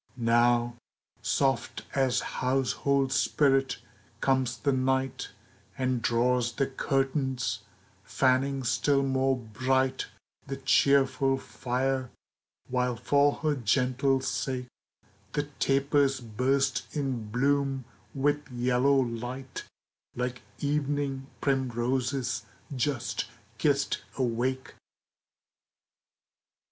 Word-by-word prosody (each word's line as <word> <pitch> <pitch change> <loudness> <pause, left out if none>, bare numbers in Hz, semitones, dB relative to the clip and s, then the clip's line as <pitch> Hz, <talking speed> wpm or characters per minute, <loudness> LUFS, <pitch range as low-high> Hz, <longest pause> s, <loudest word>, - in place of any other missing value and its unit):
Now, 120 0 +3 0.4
soft 135 -1 0
as 135 -2 +2
household 135 +1 0
spirit, 135 -3 +2 0.4
comes 130 -2 +1
the 140 +4 +1
Night 130 0 0 0.5
And 130 -2 0
draws 120 +1 +2
the 135 - +1
curtains, 135 -1 -1 0.4
fanning 135 +1 +1
still 140 +4 +2
more 135 0 +1
bright 130 +3 0 0.4
The 135 - -4
cheerful 135 0 +3
fire, 130 0 -2 0.6
while 125 -1 0
for 140 +4 +3
her 155 -1 +3
gentle 130 +2 +2
sake 130 -1 -2 0.7
The 145 - +1 0.2
tapers 140 0 +2
burst 130 +4 0
in 130 -7 -2
bloom 135 +2 +1 0.3
with 145 +2 0
yellow 125 +2 +2
light, 125 +2 -4 0.5
Like 125 0 -3 0.2
evening 145 -2 -1
primroses 130 -1 0 0.3
just 125 -3 -1 0.3
kissed 140 -2 +1 0.2
awake. 130 +1 -1
130 Hz, 85 wpm, -28 LUFS, 125-135 Hz, 0.7 s, Now